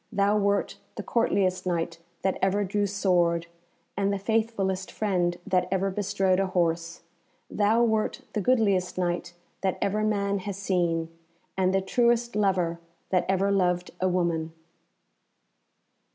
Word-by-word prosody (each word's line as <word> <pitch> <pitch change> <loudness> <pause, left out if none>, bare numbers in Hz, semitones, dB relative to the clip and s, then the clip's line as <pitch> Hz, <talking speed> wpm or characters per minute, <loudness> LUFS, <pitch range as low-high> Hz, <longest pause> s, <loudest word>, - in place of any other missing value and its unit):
Thou 200 0 +2
wert 200 -1 0 0.2
the - - -5
courtliest 190 -6 +1
Knight 170 -1 -1 0.2
that 190 0 0
ever 195 +2 +2
drew 205 +1 0
sword, 175 -4 +1 0.5
and 200 0 +1
the 200 - 0
faithfulest 200 -3 -1
friend 180 -5 0
that 185 -1 +1
ever 195 +1 0
bestrode 195 -1 +1
a 195 - +1
horse. 170 -2 -1 0.5
Thou 215 +3 +3
wert 220 -2 0
the 210 - 0
goodliest 200 -7 +2
Knight 175 -1 -2 0.3
that 190 -2 0
ever 210 +2 0
man 200 -2 0
has 195 0 -5
seen, 170 -4 -1 0.4
and 185 -1 +2
the 195 0 +2
truest 235 +3 +1
lover 185 -5 +1 0.3
that 185 -2 +2
ever 195 +1 +2
loved 180 -2 +1
a 185 - +3
woman." 170 -3 0
190 Hz, 140 wpm, -27 LUFS, 180-205 Hz, 0.5 s, Thou